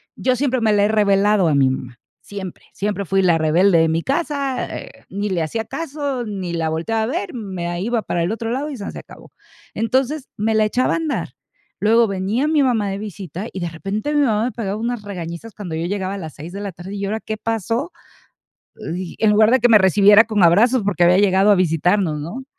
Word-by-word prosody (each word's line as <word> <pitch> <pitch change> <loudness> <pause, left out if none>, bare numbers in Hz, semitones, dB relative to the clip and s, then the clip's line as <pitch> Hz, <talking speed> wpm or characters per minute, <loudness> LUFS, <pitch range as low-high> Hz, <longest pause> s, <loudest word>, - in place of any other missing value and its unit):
y - - -12
yo 255 -1 +3
siempre 260 -3 0
me 220 -1 +3
la 205 -1 +3
he - - +3
revelado 205 -2 +3
a 145 - +2
mi 135 -1 +4
mamá, 125 -2 -6 0.2
siempre, 195 -3 -8
siempre 200 0 -2
fui 195 +2 +1
la 175 -3 +3
rebelde 170 +3 +3
de 160 0 +3
mi 165 +1 0
casa, 275 - -1
eh, - - -12
ni 205 +1 -3
le 180 -3 -1
hacía 220 +8 -3
caso 280 -3 -4
ni 190 -5 -5
la 165 -1 -1
volteaba 195 +8 -1
a - - 0
ver, 350 - -3
me 190 -7 -5
a 175 0 -3
iba 230 +4 -1
para 175 -3 -2
el 175 - -1
otro 225 0 -3
lado 275 +5 -2
y 275 - -6
sanseacabó. 200 - -10 0.4
Entonces, 265 +5 -1
me 220 +1 0
la 215 0 +4
echaba 250 +4 +1
a - - +1
andar, 320 -3 -2 0.5
luego 225 +2 +4
venía 200 +8 -1
mi 310 -2 +3
mamá 225 -6 +1
de 195 - -3
visita 200 -2 -7
y, 190 - -5
de 175 - -2
repente, 200 - -4
mi 295 - +3
mamá 220 -4 +2
me 250 - -2
pegaba 205 -5 -4
unas 235 -1 -3
regañizas 180 +1 -7
cuando 180 -6 -6
yo 165 +1 -2
llegaba 195 +1 -3
a - - -5
las 160 -5 -7
6 155 +4 -9
de 200 - -6
la 200 -2 -4
tarde. 180 +4 -8
"¿Y 200 0 -3
ahora 215 +3 -2
qué 220 0 -5
pasó?", 230 - -2 0.9
dij 175 +1 -6
en 215 -1 +3
lugar 215 +1 +5
de 260 - +5
que 245 - +4
me 220 - +7
recibiera 205 +3 +6
con 215 -3 0
abrazos, 220 +9 +4
porque 180 -3 +2
había 180 +2 +5
llegado 195 0 +4
a - - +7
visitarnos, 175 -1 +1
¿no? 210 - -6
205 Hz, 230 wpm, -20 LUFS, 180-230 Hz, 0.9 s, me